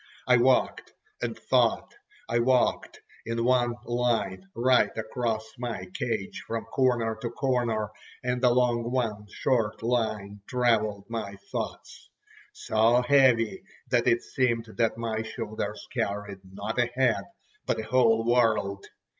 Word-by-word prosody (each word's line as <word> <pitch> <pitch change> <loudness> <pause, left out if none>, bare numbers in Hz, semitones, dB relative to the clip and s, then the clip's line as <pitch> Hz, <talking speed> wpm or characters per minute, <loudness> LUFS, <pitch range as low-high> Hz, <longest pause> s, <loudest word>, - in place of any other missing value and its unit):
I - - +5
walked - - +2 0.3
and - - -3
thought. - - +1 0.3
I 120 - +1
walked 125 +1 +1 0.2
in 115 0 -2
one 120 -1 +2
line 115 -6 -1
right 125 +2 +4
across 110 0 -2
my 115 -7 -4
cage 110 -5 -3
from 115 0 -3
corner 120 -4 +1
to 120 - -2
corner, 120 -4 -1 0.3
and 125 0 -1
along 120 -1 +3
one 110 -5 -2
short 115 -5 0
line 110 -4 -1
travelled 110 -5 +1
my 110 -4 -4 0.2
thoughts, - - -6 0.4
so 115 +3 +2
heavy 125 -5 +4 0.3
that - - +2
it 120 - +3
seemed 120 -3 0
that 115 -1 +1
my 115 -1 -2
shoulders 110 -1 -5
carried 105 -4 -3
not 105 +5 -4
a 120 - +3
head, 120 0 +1 0.4
but - - +1
a - - -3
whole 115 -1 +3
world. 115 -5 +1
115 Hz, 130 wpm, -27 LUFS, 110-125 Hz, 0.4 s, I